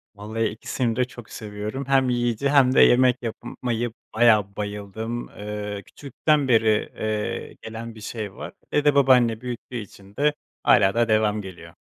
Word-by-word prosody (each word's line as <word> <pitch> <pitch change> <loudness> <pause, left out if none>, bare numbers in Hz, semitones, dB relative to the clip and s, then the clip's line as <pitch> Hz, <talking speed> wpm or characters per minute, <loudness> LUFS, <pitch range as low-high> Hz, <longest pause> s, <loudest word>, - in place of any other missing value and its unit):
Vallahi 110 +2 -3
ikisini 115 +2 -2
de 125 - +2
çok 120 -3 -13
seviyorum, 105 +5 -6
hem 135 -2 +3
yiyici 120 +2 0
hem 135 -3 +5
de - - +7
yemek 125 0 +5
yap, 115 -2 -3
eee, - - -6 0.2
yapmaya 120 +1 -2 0.2
bayağı 110 -4 +4
bayıldığım, 105 +3 -5
ııı, 105 -1 -6
küçüklükten 145 +1 -1
beri, 110 -3 +3
eee, 110 -1 -3
gelen 115 +1 -7
bir 110 - -12
şey 105 -2 -5
var. - - -8 0.2
Evde 145 -1 +3
babaanne 125 -5 +4
büyüttüğü 125 0 -7
için 100 -2 -11
de 150 +1 +2 0.3
hâlâ 95 +1 +5
da 120 0 +3
devamı 110 -1 +2
geliyor. 85 -4 -11
115 Hz, 160 wpm, -24 LUFS, 105-125 Hz, 0.3 s, de